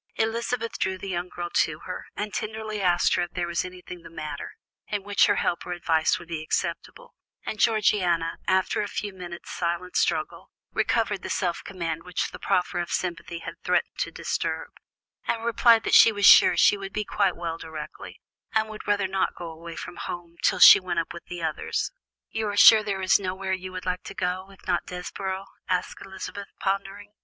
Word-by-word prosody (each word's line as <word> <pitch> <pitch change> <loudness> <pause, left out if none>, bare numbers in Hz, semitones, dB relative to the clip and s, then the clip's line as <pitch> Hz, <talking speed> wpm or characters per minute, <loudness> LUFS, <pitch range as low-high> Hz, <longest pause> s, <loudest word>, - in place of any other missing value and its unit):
Elizabeth 230 +1 -1
drew 190 0 0
the 195 - -7
young 175 0 -3
girl 175 -1 -5
to 155 -1 +1
her, 180 - -7
and 210 -1 -4
tenderly 215 0 -4
asked 175 -2 +3
if 175 0 -1
there 175 -1 -1
was 170 0 -1
anything 180 -1 -9
the - - -12
matter, 155 -3 -6 0.3
in 205 -2 -3
which 205 0 +3
her 205 - +3
help 170 - 0
or 180 - -4
advice 165 -2 +1
would 175 - -12
be 165 -2 -3
acceptable, - - -3 0.3
and 215 - -4
Georgiana, 185 -7 +2
after 190 +2 +2
a 205 - -2
few 205 0 -4
moments' 175 -2 -8
silent 175 +1 -3
struggle, - - 0 0.2
recovered 210 -4 +1
the - - -6
self 175 -3 -1
command 165 -4 -4
which 180 0 -3
the - - -9
proffer 180 0 0
of 175 0 -3
sympathy 170 -1 -3
had - - -5
threatened - - 0
to - - 0
disturb, - - -3 0.6
and 225 0 -1
replied 230 -1 +5
that - - -2
she 225 - +9
was 205 -2 0
sure - - +8
she 205 - +5
would 195 0 -7
be 210 0 -2
quite 195 -3 +1
well 165 -1 -4
directly, 160 -1 -8 0.4
and 220 0 +2
would 215 - -9
rather 205 -2 +2
not 190 0 -1
go 170 -2 -7
away 165 +1 -9
from 175 - -8
home 175 -1 -6
until - - +2
she - - +10
went 175 -3 -2
with 170 - -10
the 175 -1 -7
others. 160 -2 -2 0.4
"You 220 -1 -2
are 205 0 -3
sure 220 0 +9
there 200 -2 -3
is 185 - +5
nowhere 190 0 -3
you 185 0 -4
would 185 0 -7
like 180 0 -1
to 195 - -8
go, 185 +1 -2
if 195 - -18
not 175 - 0
Desborough?" 190 +2 -5 0.2
asked 185 +1 -1
Elizabeth, 195 +1 -7
pondering. 195 +1 -3
185 Hz, 195 wpm, -26 LUFS, 175-205 Hz, 0.6 s, she